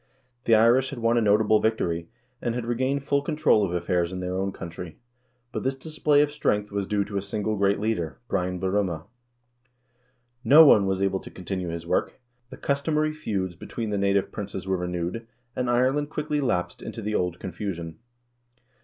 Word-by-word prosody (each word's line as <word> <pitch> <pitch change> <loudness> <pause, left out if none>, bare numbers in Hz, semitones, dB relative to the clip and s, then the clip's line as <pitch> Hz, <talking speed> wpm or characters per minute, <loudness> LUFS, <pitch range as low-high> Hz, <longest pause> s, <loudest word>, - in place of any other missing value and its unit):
The 115 - +6
Irish 120 +4 +4
had 140 - -7
won 115 0 +2
a - - +1
notable 105 0 +4
victory, 85 -7 -1 0.3
and 120 -1 -1
had 125 -2 -3
regained 130 +4 0
full 140 0 +1
control 150 -7 +2
of 95 - -1
affairs 85 0 0
in 95 - -4
their 90 0 -3
own 95 +1 -1
country, 85 -1 -8 0.5
but - - -3
this 135 +1 -1
display 150 +1 +2
of 145 - -2
strength 105 -8 0
was 100 -1 -2
due 105 -1 +1
to 100 0 -4
a - - 0
single 105 +2 -2
great 100 0 +2
leader 105 -7 -2
— - - -46
Brian 90 -2 -1
Borumha. 95 -4 -1 1.4
No 155 +4 +9
one 100 -8 +6
was 95 0 0
able 95 -1 +1
to - - -11
continue 95 0 -5
his 85 0 -5
work; 85 - -1 0.3
the - - -10
customary 150 +2 0
feuds 95 - -3
between 110 +5 -5
the 100 - 0
native 100 0 +1
princes 100 -2 -5
wrere 95 -1 0
renewed, 90 +5 -3 0.3
and 125 -1 -1
Ireland 130 +4 +2
quickly 150 -1 -2
lapsed 90 -10 -1
into - - -7
the 105 +1 -2
old 90 -3 0
confu 95 +2 -4
sion. 85 -1 -8
105 Hz, 190 wpm, -26 LUFS, 90-125 Hz, 1.4 s, No